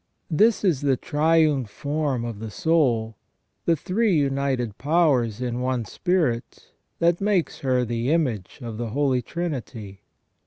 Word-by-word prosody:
This 215 +6 +3
is 170 -9 +2
the 140 -3 +2
triune 155 -3 +2
form 145 +1 -2
of 115 -3 -5
the 110 0 -6
soul, 120 -8 +1 0.5
the 170 - +3
three 195 +5 +1
united 135 -6 0
powers 140 -8 +2
in 125 0 -2
one 125 -2 -1
spirit, 160 - -1 0.3
that 170 +1 +2
makes 195 -4 0
her 125 -2 +1
the 120 +2 -2
image 130 - -1
of 115 -2 -6
the 120 -1 -3
Holy 135 +1 +1
Trinity. 120 - -5
135 Hz, 140 wpm, -24 LUFS, 120-165 Hz, 0.5 s, This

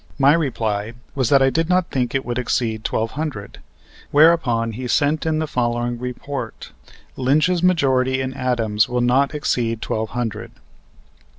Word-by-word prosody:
My 140 +1 +5
reply 115 -9 -1 0.2
was 130 -4 0
that 135 -1 +5
I 135 - +3
did 165 +3 0
not 180 -1 +1
think 125 -1 -1
it 135 - -1
would 120 +1 -2
exceed 115 -2 -1
twelve 115 -1 -1
hundred; 145 -10 -5 0.5
whereupon 145 -7 +3
he 125 +3 -5
sent 150 +5 +1
in 160 -1 +1
the 155 - 0
following 120 -3 -1
report: 125 -1 -6 0.4
"Lynch's 155 +7 +2
majority 130 -7 +2
in 130 0 -3
Adams 120 -4 0
will 125 0 0
not 135 +4 +2
exceed 115 -6 -1
twelve 110 -1 -3
hundred." 120 -4 -4
130 Hz, 155 wpm, -21 LUFS, 115-145 Hz, 0.5 s, My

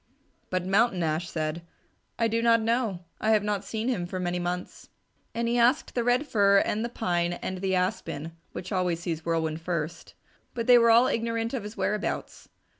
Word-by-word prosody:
But 185 -1 -1
Mountain 195 -1 +2
Ash 160 +2 -1
said, 155 +1 -3 0.6
"I 230 - +2
do 230 +1 0
not 230 0 +5
know. 225 -5 0 0.2
I 215 - 0
have 210 -1 +3
not 205 -1 -1
seen 220 +3 -3
him 185 -9 -1
for 185 +1 -4
many 180 0 -1
months." 175 +1 -5 0.5
And 235 0 0
he 240 +1 +1
asked 250 +7 +3
the 240 - 0
Red 245 +4 +2
Fir, 200 -6 +4
and 215 +2 -1
the 235 - -2
Pine, 175 -6 -1
and 185 +1 -5
the 190 0 0
Aspen, 165 -3 -2 0.2
which 185 - -7
always 180 -3 0
sees 165 -2 -3
Whirlwind 160 -1 -1
first, 165 -1 -4 0.4
but 230 -2 -2
they 245 0 +7
were 230 0 +5
all 230 +2 +7
ignorant 230 -1 -1
of 260 - -2
his 210 +2 -9
whereabouts. 210 0 -3
200 Hz, 190 wpm, -27 LUFS, 175-230 Hz, 0.6 s, they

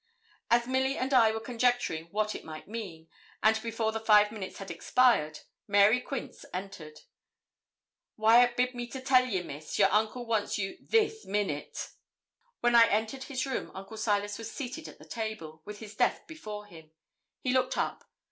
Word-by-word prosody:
As 235 0 +4
Milly 265 +2 0
and 265 +2 -1
I 230 -4 +6
were 220 - -3
conjecturing 245 -9 0
what 215 +4 -1
it - - -7
might 155 -1 -9
mean, 190 -7 -7 0.4
and 220 0 +4
before 225 -1 -1
the 225 - -3
five 210 -1 +5
minutes 205 -4 -7
had 195 - -7
expired, 170 -5 +2 0.3
Mary 205 +4 +5
Quince 270 0 -6
entered. 180 -5 -7 1.2
'Wyat 240 +3 +5
bid 250 0 +2
me 240 -1 -5
tell 260 0 +2
you, 190 -7 -1
Miss, 150 -1 -7
your - - +5
uncle 220 +3 +1
wants 220 -3 0
you 195 -2 -4
this 440 0 +1
minute.' 195 -8 -2 0.7
When 240 0 +3
I 230 -1 +8
entered 220 +5 -1
his 260 -2 -2
room, 265 -3 -3
Uncle 195 +3 -8
Silas 205 -1 0
was 225 0 -6
seated 285 +3 -6
at - - -12
the - - -15
table, 215 -9 -5
with 210 0 -7
his 215 -1 -10
desk - - +1
before 215 -10 -8
him. 160 -6 -14 0.5
He 255 - -1
looked 255 -1 +1
up. - - -2
220 Hz, 170 wpm, -30 LUFS, 200-245 Hz, 1.2 s, I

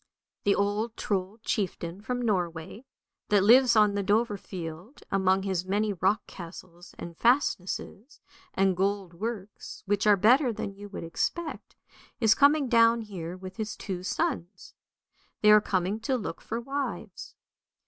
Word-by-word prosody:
The 200 - +4
old 210 +3 -1
Trold 200 +1 -3
chieftain 185 -2 -3
from 245 +3 -3
Norway, 180 +1 -2 0.4
that 205 -2 +4
lives 245 +3 +6
on 210 -1 +5
the 200 - 0
Dovrefield, 200 - -3
among 190 0 +2
his 190 -3 -1
many 205 +3 0
rock 195 +4 +1
castles 175 0 -11
and 170 -1 -8
fastnesses 235 - 0 0.4
and 190 -1 +2
gold 195 -1 -1
works, 205 +1 -6
which 205 +1 +1
are 205 -1 +6
better 245 +7 +4
than 200 -2 -5
you 205 +1 -11
would 195 - -7
expect, 310 - -3 0.4
is 220 -3 +5
coming 285 +1 +4
down 230 -1 +4
here 180 -5 -7
with 185 0 -10
his 220 -1 -4
two 185 -3 -5
sons. 205 - -3 0.7
They 210 - +6
are 210 0 +8
coming 190 +2 -1
to 255 +4 -1
look 220 - -6
for 230 - -4
wives. 275 +4 -5
205 Hz, 145 wpm, -28 LUFS, 185-230 Hz, 0.7 s, are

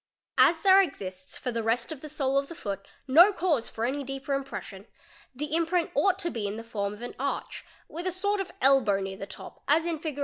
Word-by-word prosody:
As 325 -1 +6
there 385 +1 +7
exists 185 - -5
for 250 - -3
the 230 -1 -2
rest 230 +4 0
of 300 -4 -7
the 305 - -7
sole 275 -2 0
of 275 - -4
the 335 - -9
foot 195 -6 -5 0.2
Tio 330 +9 +7
cause 330 - 0
for 225 - -3
any 280 +3 -1
deeper 270 +1 -4
impression 235 -7 -5 0.5
the 300 +3 -4
imprint 335 +1 +1
ought 390 -2 +3
to 340 - -2
be 215 -3 -2
in 200 - -4
the 225 - -6
form 205 -3 -3
of 210 +3 -10
an 245 - -6
arch 280 +1 -3 0.2
with 345 +4 -5
a - - +1
sort 405 +3 0
of 375 - -6
elbow 260 -7 +4
near 190 0 -4
the 195 - -7
top - - -10
as 315 +3 +4
in 335 -2 -2
Fig. 305 -3 -4
275 Hz, 235 wpm, -28 LUFS, 225-330 Hz, 0.5 s, there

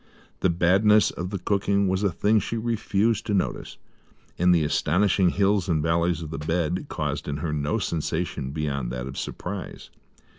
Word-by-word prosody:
The 95 - +2
badness 95 +5 +4
of 90 +1 -5
the 100 - -3
cooking 100 +1 +1
was 95 +1 0
a 100 -3 +1
thing 105 +6 +2
she 115 +4 -3
refused 110 -1 0
to 105 - +1
notice; 95 - -2 0.6
and 90 +1 +4
the 85 -3 +4
astonishing 90 +5 +2
hills 100 -1 +1
and 80 -3 +1
valleys 85 +1 +1
of 80 - -7
the 80 - -4
bed 85 - -1
caused 75 -3 -3
in 70 -1 -2
her 75 0 -3
no 75 +8 -1
sensation 85 -6 -2
beyond 70 -4 -3
that 60 0 -4
of 65 0 -7
surprise. 95 +6 -6
90 Hz, 175 wpm, -25 LUFS, 75-100 Hz, 0.6 s, badness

